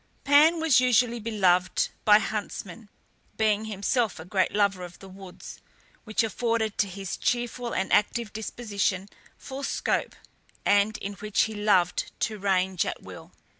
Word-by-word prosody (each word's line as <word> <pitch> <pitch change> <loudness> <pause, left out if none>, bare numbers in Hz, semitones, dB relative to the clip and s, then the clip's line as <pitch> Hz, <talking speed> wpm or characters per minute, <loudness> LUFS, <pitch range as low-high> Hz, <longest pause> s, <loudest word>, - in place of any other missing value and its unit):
Pan 300 +4 +5
was 320 -5 +4
equally 245 -1 +2
beloved 190 -5 +1 0.2
by 210 -1 +8
huntsmen, 210 -1 -5 0.5
being 215 -1 +1
himself 215 +1 -1
a 160 - -9
great 185 +1 0
lover 200 -3 +1
of 175 0 -10
the 195 - -13
woods, 190 -1 -11 0.5
which 215 0 0
afforded 225 0 -1
to 205 - +3
his 195 0 -5
cheerful 240 0 -2
and 190 - -1
active 215 +1 +1
disposition 205 -3 -2 0.3
full 270 +1 -8
scope, 275 - -1 0.5
and 205 +1 +3
in 200 - -6
which 210 0 0
he 220 - -3
loved 205 -4 +1
to 215 -1 -2
range 190 -2 +1
at - - -5
will. - - -11
210 Hz, 145 wpm, -26 LUFS, 195-230 Hz, 0.5 s, by